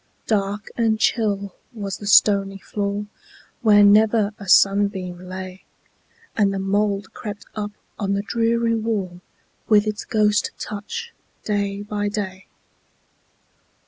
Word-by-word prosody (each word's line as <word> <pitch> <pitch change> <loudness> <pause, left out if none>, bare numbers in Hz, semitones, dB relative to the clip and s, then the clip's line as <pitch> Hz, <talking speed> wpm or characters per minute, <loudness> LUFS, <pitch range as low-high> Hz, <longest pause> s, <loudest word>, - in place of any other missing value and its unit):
Dark 205 -1 -1
and 225 -2 +1
chill 200 -5 0 0.2
was 200 -3 -5
the 205 - -7
stony 195 -1 +4
floor, 200 +1 -3 0.6
Where 210 -2 +6
never 210 +1 +4
a 200 -2 -8
sunbeam 195 -3 +3
lay, 185 0 -7 0.7
And 205 -2 +3
the 195 - -3
mould 200 +1 -1
crept 210 -2 -7
up 210 -1 -4 0.3
on 200 -2 0
the 200 0 -1
dreary 230 +1 +1
wall, 210 -6 -2 0.5
With 210 -1 +5
its 215 -1 -3
ghost 210 -2 +2
touch, 215 - -6 0.3
day 200 -1 -2
by 205 0 -2
day. 190 -2 -5
205 Hz, 120 wpm, -22 LUFS, 195-215 Hz, 0.7 s, Where